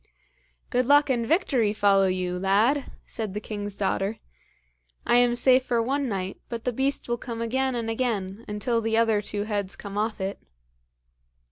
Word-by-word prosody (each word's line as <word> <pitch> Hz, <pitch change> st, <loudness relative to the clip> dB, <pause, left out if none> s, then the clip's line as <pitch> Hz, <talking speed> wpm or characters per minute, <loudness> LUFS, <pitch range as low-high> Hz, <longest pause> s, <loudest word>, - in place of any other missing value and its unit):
"Good 250 Hz, -1 st, +1 dB
luck 290 Hz, 0 st, +5 dB
and 235 Hz, -2 st, 0 dB
victory 255 Hz, -, +2 dB
follow 200 Hz, -2 st, +4 dB
you, 180 Hz, -1 st, -2 dB
lad!" 215 Hz, +9 st, +2 dB, 0.2 s
said 215 Hz, -3 st, -5 dB
the -, -, -1 dB
king's 205 Hz, -1 st, -5 dB
daughter. 200 Hz, +2 st, -1 dB, 0.9 s
"I 240 Hz, -, +4 dB
am 245 Hz, -1 st, +4 dB
safe 255 Hz, +1 st, +5 dB
for 240 Hz, -2 st, 0 dB
one 270 Hz, +3 st, 0 dB
night, 190 Hz, -2 st, -4 dB
but 230 Hz, -1 st, -5 dB
the 250 Hz, -, -1 dB
beast 270 Hz, +3 st, 0 dB
will 240 Hz, -1 st, -1 dB
come 230 Hz, -2 st, -6 dB
again 260 Hz, +3 st, 0 dB
and 230 Hz, -1 st, -3 dB
again, 225 Hz, -3 st, -2 dB
until 230 Hz, +3 st, -1 dB
the 225 Hz, 0 st, 0 dB
other 225 Hz, -2 st, +3 dB
two 205 Hz, 0 st, -3 dB
heads 205 Hz, -3 st, -3 dB
come 200 Hz, 0 st, -6 dB
off 215 Hz, 0 st, -1 dB
it." 195 Hz, +1 st, -4 dB
225 Hz, 170 wpm, -26 LUFS, 205-245 Hz, 0.9 s, luck